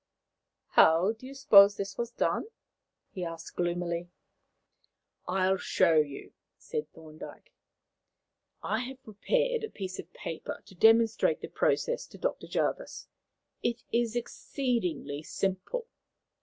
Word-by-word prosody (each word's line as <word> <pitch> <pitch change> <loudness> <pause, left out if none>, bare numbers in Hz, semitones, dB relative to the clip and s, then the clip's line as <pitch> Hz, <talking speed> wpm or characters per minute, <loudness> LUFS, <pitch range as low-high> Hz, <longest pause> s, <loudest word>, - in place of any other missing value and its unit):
"How 165 +6 +5
do 225 +3 -10
you 275 - -10
suppose 205 -7 +7
this 195 -1 -4
was 235 -1 -3
done?" 240 - -1 0.6
he 185 - -5
asked 165 -1 -7
gloomily. 175 0 -2 1.2
"I 185 +1 +1
will 190 0 +2
show 165 - +3
you," 150 -3 0 0.2
said 460 -1 -5
Thorndyke. 155 -1 -12 1.1
"I 220 - 0
have 260 +1 -7
prepared 480 - 0
a 440 - -3
piece 190 - -6
of - - -8
paper 165 - -6
to - - -15
demonstrate 225 +3 +4
the - - -6
process - - 0
to - - -13
Dr. - - -3
Jervis. - - -2 0.5
It 235 0 -1
is 235 -1 +1
exceedingly 235 - -2
simple." 195 - -2
200 Hz, 125 wpm, -29 LUFS, 175-250 Hz, 1.2 s, suppose